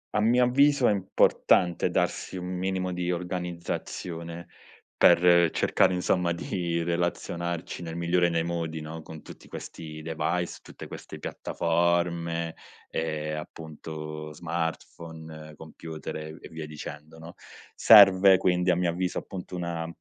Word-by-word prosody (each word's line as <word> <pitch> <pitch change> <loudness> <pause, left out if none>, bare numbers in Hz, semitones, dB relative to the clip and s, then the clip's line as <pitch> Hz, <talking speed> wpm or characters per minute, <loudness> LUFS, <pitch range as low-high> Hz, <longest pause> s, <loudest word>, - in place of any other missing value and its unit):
a - - +3
mio 120 +3 +4
avviso, 140 +1 +4
è - - +4
importante 95 -2 +2
darsi - - -1
un 90 0 -5
minimo 95 0 -1
di 90 0 -1
organizzazione, 85 -1 -5 0.5
per 85 -2 +6
cercare, 95 - +2
insomma, 90 -1 +1
di 85 0 -2
relazionarci 85 0 -2
nel 80 -1 -6
migliore 85 +1 +2
dei 85 -1 +1
modi, 85 -2 -3
no, 80 +1 -7
con 80 -1 -10
tutti - - -13
questi 80 -1 -8
device, 85 +2 -2
tutte - - -10
queste - - -9
piattaforme, 85 -1 -1 0.3
ehm, 75 -1 -3
appunto, 75 -1 -8
smartphone, 80 -1 -6
computer 80 0 -8
e 80 0 -6
e - - -11
via 80 -1 -7
dicendo, 75 +1 -9
no? 80 +1 -11 0.4
Serve 95 -3 +8
quindi, 90 -1 +2
a - - +3
mio 90 0 +1
avviso, 90 +2 -1
appunto, 90 -1 -8
una 85 -2 -3
85 Hz, 130 wpm, -27 LUFS, 80-90 Hz, 0.5 s, Serve